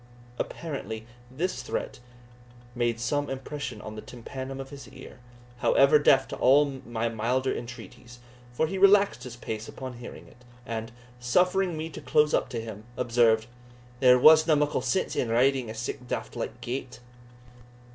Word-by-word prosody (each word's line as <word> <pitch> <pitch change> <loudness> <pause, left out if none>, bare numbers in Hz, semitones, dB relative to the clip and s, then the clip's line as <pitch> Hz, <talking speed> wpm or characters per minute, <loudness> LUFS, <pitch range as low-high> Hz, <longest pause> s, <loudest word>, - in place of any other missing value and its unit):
Apparently 110 - -5 0.2
this 165 +9 -3
threat - - -4 0.7
made 120 -1 0
some 145 +4 -1
impression 135 +2 -5
on 110 - -7
the 110 - -7
tympanum 130 +3 -7
of 135 +1 -7
his 140 -1 -10
ear, 130 -1 -12 0.4
however 140 +4 +5
deaf 135 -2 +4
to - - -6
all 135 0 +3
my 115 -1 -1
milder 120 +4 0
entreaties; 120 0 -9 0.3
for 120 +6 +1
he 190 +4 -3
relaxed 195 - +5
his 125 -2 -8
pace 110 -2 -6
upon 130 -2 -8
hearing 120 - -10
it, 125 - -20 0.2
and, 115 0 -5 0.3
suffering 180 +7 +2
me 155 +1 -3
to 160 - -9
close 150 0 +3
up - - +1
to 120 - -4
him, 110 -2 -8
observed, 115 -2 +3 0.5
"There 125 -1 +7
wasna 155 +4 +7
muckle 145 -2 +1
sense 130 +9 -1
in 120 - 0
riding 125 +1 +2
at 110 - -7
sic 120 +2 -4
a - - -14
daft - - -4
like - - -5
gate." 125 0 -5
125 Hz, 160 wpm, -27 LUFS, 120-145 Hz, 0.7 s, There